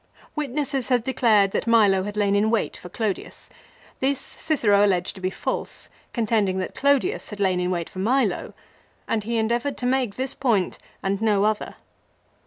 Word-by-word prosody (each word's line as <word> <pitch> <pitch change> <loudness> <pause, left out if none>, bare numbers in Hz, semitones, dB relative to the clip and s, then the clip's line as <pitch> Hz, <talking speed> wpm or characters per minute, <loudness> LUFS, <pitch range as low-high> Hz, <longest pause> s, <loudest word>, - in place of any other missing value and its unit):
Witnesses 285 -2 -2
had 245 -3 +2
declared 220 -6 +3
that - - -2
Milo 210 -5 +5
had 205 +2 -5
lain 200 -1 +2
in 210 +2 +3
wait 225 -1 0
for 180 - -10
Clodius. 210 0 -4 0.5
This 275 +1 +1
Cicero 210 -10 +1
alleged 185 -3 +1
to 190 - -12
be 185 - 0
false, 190 - -4 0.2
contending 215 -5 +1
that 185 - -3
Clodius 285 - +1
had 210 - -8
lain 190 -2 +2
in 180 0 0
wait 175 -2 -1
for 185 - -9
Milo, 255 +7 0 0.5
and 220 -2 0
he 235 +1 -1
endeavoured 235 +5 0
to 245 - -4
make 250 -5 +1
this 265 +1 -3
point 230 -9 0 0.2
and 195 +1 -1
no 210 -3 +3
other. 215 0 0
220 Hz, 175 wpm, -24 LUFS, 195-255 Hz, 0.5 s, Milo